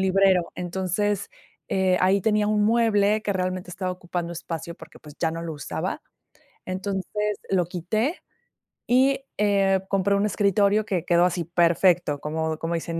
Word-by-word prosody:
librero. 190 -2 +3
Entonces, 190 +3 -2 0.4
eh, 190 -1 +2
ahí 190 +2 +3
tenía 210 +1 +2
un 210 0 +2
mueble 215 -2 +3
que 205 - -1
realmente 185 -1 -3
estaba 185 +1 -3
ocupando 175 -1 -4
espacio 170 0 -6
porque, - - -14
pues, 150 -1 -14
ya 165 - +1
no 165 +1 -5
lo 165 -2 -5
usaba. 145 - -4 0.6
Entonces, 200 +2 -3
lo 185 -2 +2
quité 215 - -2 0.7
y, 270 +2 +3
eh, 195 -2 +2
compré 200 0 +2
un 200 +1 +1
escritorio 205 0 +2
que 185 -6 -1
quedó 175 0 +4
así, 180 -1 -1
perfecto, 170 -2 +2
como 160 +1 -2
como 165 +2 -2
dicen: 165 0 -3
185 Hz, 150 wpm, -24 LUFS, 175-205 Hz, 0.7 s, quedó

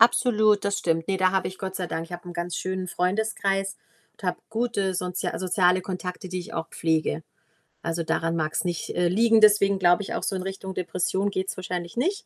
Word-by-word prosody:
Absolut, 215 -3 +5
das 200 0 +1
stimmt. 165 0 0
Ne, 195 - +2
da 185 0 +3
habe 190 -1 +1
ich, 185 - -10
Gott 190 -1 -4
sei 180 - -2
Dank 165 -1 -3
ich 165 - -13
habe 175 +1 -7
‘n - - -6
ganz 175 0 -3
schönen 185 0 -2
Freundeskreis 195 +1 0 0.4
und - - -22
habe - - 0
gute 220 -5 0
soz 180 0 -2 0.2
soziale 185 0 +3
Kontakte, 180 0 -5
die 185 0 -3
ich 175 - -8
auch 165 0 -3
pflege. 160 - 0 0.6
Also, 165 0 -2
daran 165 +1 0
mag's 155 +1 0
nicht, 175 -2 -3
äh, 175 0 +3
liegen, 225 +4 +4
deswegen 200 -2 +6
glaube 175 +2 +4
ich - - -5
auch, - - -2
so 195 - -1
in 185 - -3
Richtung 190 0 -5
Depression 185 +3 0
geht‘s 190 0 -2
wahrscheinlich 180 0 -4
nicht, 375 +11 0
185 Hz, 210 wpm, -26 LUFS, 175-200 Hz, 0.6 s, deswegen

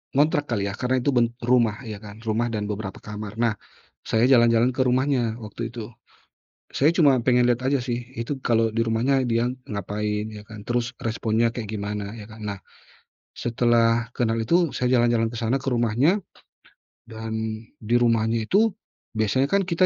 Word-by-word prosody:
ngontrak 145 +1 +3
kali 100 -4 -1
yah - - -6
karena 125 +1 +1
itu 145 - +2
ben 120 -2 +3 0.2
rumah 120 -1 +2
ya 105 -3 -7
kan. 105 -1 -11
Rumah 115 +2 0
dan 105 -1 -1
beberapa 100 -2 -5
kamar. 105 -1 -6
Nah 115 -2 +3 0.5
saya 115 +1 +2
jalan-jalan 120 0 +5
ke 130 - -1
rumahnya 125 -3 +1
waktu 105 +2 -8
itu, 115 -1 -7 0.8
saya 145 +4 +3
cuma 140 -6 +5
pengen 125 -1 +4
lihat 120 +1 +1
aja 140 0 +2
sih 120 -1 -2 0.2
itu 135 +4 -3
kalau 115 -1 +3
di - - 0
rumahnya 125 +4 +1
dia 115 0 +1 0.2
ngapain, 105 +1 -2
ya 105 -1 -9
kan. 110 -2 -10
Terus 120 +1 -1
responnya 115 0 +1
kayak 110 -4 -5
gimana, 105 0 -4
ya 105 - -9
kan. 110 0 -12
Nah 100 -2 -4 0.8
setelah 115 0 +2
kenal 115 -2 +1
itu 170 +6 +2
saya 125 - 0
jalan-jalan 120 -1 +2
ke 120 - -7
sana 115 +3 +1
ke - - -3
rumahnya 120 - +2 0.9
dan 110 0 -4 0.2
di 115 +1 0
rumahnya 115 -1 +2
itu 215 +1 +3 0.4
biasanya 110 +6 +2
kan 200 +5 +2
kita 185 0 +2
115 Hz, 170 wpm, -24 LUFS, 110-125 Hz, 0.9 s, jalan-jalan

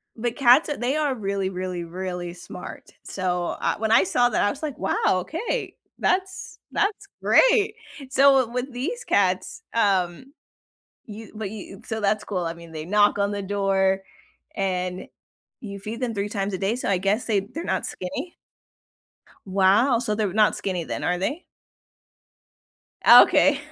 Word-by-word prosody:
But 235 +1 -3
cats, 270 +3 +5
they 245 +4 0
are 295 -4 0
really, 195 -3 -2
really, 180 -1 -4
really 180 0 -5
smart. 175 - -10
So, 180 -2 -2
uh - - +1
when 220 0 -1
I 225 -4 +6
saw 240 +6 +2
that, - - 0
I 205 - +3
was, 275 - -6
like, 295 -4 -4
"Wow, 195 - -1 0.2
okay. 330 - -4 0.2
That's 375 0 -1
that's 410 0 -1
great." 440 -4 +4 0.3
So, 270 -2 +4
with 250 +3 -4
these 370 - -4
cats, 185 - 0
um, 200 +3 0 0.7
you 215 0 -10
but 215 -2 -4
you 200 -2 -9
so, 220 0 -4
that's 210 +1 +1
cool, 185 -4 -3
I 165 - -2
mean 170 -1 -13
they 155 -1 -6
knock 205 +3 +3
on 200 0 +1
the 205 0 -3
door 195 -1 +1 0.5
and 185 -1 -2 0.5
you 200 -3 -7
feed 215 +5 -7
them 245 -2 -1
3 200 +1 -2
times 200 -1 -3
a - - -1
day, 195 +5 0
so 250 - -3
I 195 - +2
guess 200 +5 0
they 215 -3 +2
they're 250 - -7
not - - -1
skinny. 260 - -6 1.1
Wow, 195 +7 +3
so, 230 -3 -2
they're 210 -2 -1
not 210 0 +3
skinny 185 -3 -3
then, - - -5
are 180 - 0
they? 280 - -3 1.6
Okay. 285 -1 +7
205 Hz, 160 wpm, -24 LUFS, 190-250 Hz, 1.6 s, Okay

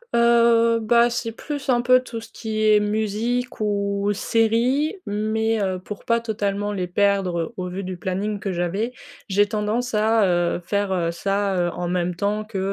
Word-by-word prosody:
Heu, 235 -1 +4
bah, 235 +2 +4
c'est 235 -1 -3
plus, 285 +3 -6
un 240 -1 +3
peu, 255 +1 +5
tout 230 -3 -7
ce 225 - -12
qui 215 -1 -3
est 210 -1 +6
musique 220 +4 -1
ou 200 -1 0
série 235 - +1
mais 220 +2 0
heu, 190 -2 -1
pour 205 +2 -9
pas 230 0 +2
totalement 205 -2 -2
les 185 -3 -2
perdre 185 -2 0
au 180 0 -3
vu 190 +2 -5
du 185 -1 -5
planning 200 +3 -2
que 195 - -3
j'avais, 190 +8 -2 0.3
j'ai 205 +1 +3
tendance 215 +3 -2
à, 215 -1 +3
heu, 175 -1 +1
faire, 200 +1 -1
heu, 170 -2 0
ça, 195 +2 -1
heu, 175 0 +1
en 175 - -4
même 180 0 -1
temps 205 +3 -1
que, 210 -3 -5
210 Hz, 180 wpm, -22 LUFS, 195-230 Hz, 0.3 s, est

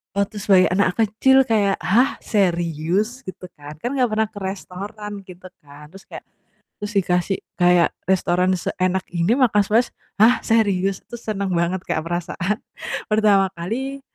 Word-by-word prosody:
waktu 200 +2 -1
sebagai 190 -2 +4
anak 185 -1 +2
kecil 225 +5 +3
kayak, 210 -5 +1
"Hah 240 +8 +3
serius?" 180 - 0
Gitu 180 -1 -9
kan 145 +1 -10
kan 245 - -2
gak 250 - +4
pernah 220 0 0
ke 205 - -9
restoran 200 +2 -6 0.2
gitu 185 0 -12
kan. 145 +1 -15
Terus 195 +1 -14
kayak - - -9 0.6
terus 210 0 -5
dikasih 180 0 +1 0.2
kayak 175 -1 +4 0.2
restoran 185 0 +2
seenak 185 +2 -1
ini 175 +8 +1
makan 235 -6 +4
sepuas 220 +5 +1 0.2
"Hah, 225 +4 +5
serius?" 195 -4 +1
Itu - - -22
seneng 200 -4 -3
banget 175 +2 -1
Kak 160 - -1
perasaan 175 +4 -3 0.5
pertama 210 -2 +3
kali 260 +11 -4
195 Hz, 150 wpm, -21 LUFS, 180-215 Hz, 0.6 s, Hah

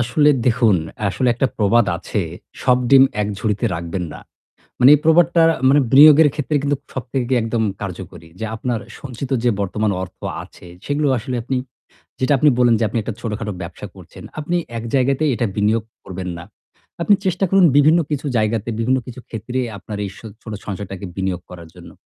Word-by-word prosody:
আসলে 145 +5 +3 0.2
দেখুন, 115 -4 +3 0.3
আসলে 125 +6 0
একটা 135 - +1
প্রবাদ 110 +1 +3
আছে, 100 +4 -3 0.4
'সব 125 -1 +3
ডিম 135 -1 +8 0.2
এক 105 - -1
ঝুড়িতে 105 -2 -1
রাখবেন 85 +2 -4
না।' - - -10 0.6
মানে 125 +2 +7
এই - - -3
প্রবাদটার 165 0 +5
আ - - -8
মানে 145 +2 +5
বিনিয়োগের 150 +2 +8
ক্ষেত্রে 150 0 -2
কিন্তু 145 0 0 0.2
সবথেকে 130 0 -3
একদম 115 0 -1 0.2
কার্যকরী। 90 -4 -8
যে 110 - -3
আপনার 115 0 -2 0.2
সঞ্চিত 130 0 -7
যে 120 - +3
বর্তমান 105 +2 -1
অর্থ 95 - -11 0.2
আছে 90 - -15 0.2
সেগুলো 145 +1 0
আসলে 130 +2 -4
আপনি 130 +2 -2 0.6
যেটা 130 +2 +2
আপনি 150 +3 +4
বললেন 120 -2 +4
যে - - +1
আপনি 115 - -3
একটা 115 - -4
ছোটখাটো 105 -2 -4
ব্যবসা 85 0 -8
করছেন। - - -13 0.2
আপনি 160 +4 -2 0.2
এক 115 - -5
জায়গাতে 135 +2 +2
এটা 120 - -1
বিনিয়োগ 105 +2 +1 0.2
করবেন 95 -1 -6
না। 85 - -8 0.6
আপনি 205 - +4
চেষ্টা 185 +1 +1
করুন 195 -1 +5
বিভিন্ন 155 +4 +5
কিছু 145 0 -2
জায়গাতে, 110 0 0
বিভিন্ন 125 +3 +2
কিছু 125 0 -9
ক্ষেত্রে 120 +3 -4 0.2
আপনার 105 +1 -7
এই 100 - -5
সো - - -13 0.2
ছোট 110 - -8
সঞ্চয়টাকে 100 -1 -6
বিনিয়োগ 95 -2 -2
করার 85 -2 -11
জন্য। - - -13
120 Hz, 180 wpm, -19 LUFS, 105-140 Hz, 0.6 s, ডিম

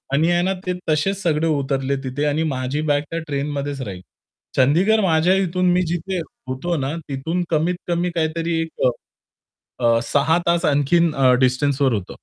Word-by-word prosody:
...आणि 160 +5 +3
आहे 175 0 +2
ना, 190 +1 +1
ते 180 - +1 0.2
तसेच 155 +6 +1
सगळे 160 -2 +1
उतरले 140 -2 0
तिथे 130 +3 -2
आणि 150 +2 +1
माझी 130 +4 -2
बॅग 145 0 +2
त्या 165 - -2
ट्रेनमध्येच 140 -1 -3
राहिली. 95 -5 -7 0.5
चंदीगड 175 +12 +4
माझ्या 175 -1 +3
इथून 180 +1 +1
मी 180 +1 +3
जिथे 175 +3 -2 0.3
होतो 165 +7 -2
ना, 135 +3 -2
तिथून 160 +6 -2
कमीत 170 +2 +1
कमी 175 +1 0
काहीतरी 165 +1 -1
एक, 165 0 -3 0.2
अ, - - +5 1.0
अ, 115 0 +4
6 150 +4 +3
तास 170 0 +2
आणखीन 155 +4 +2
अ, 130 -2 +4
डिस्टन्सवर 135 +1 +1
होतं. 100 -4 -4
155 Hz, 165 wpm, -21 LUFS, 140-170 Hz, 1.0 s, अ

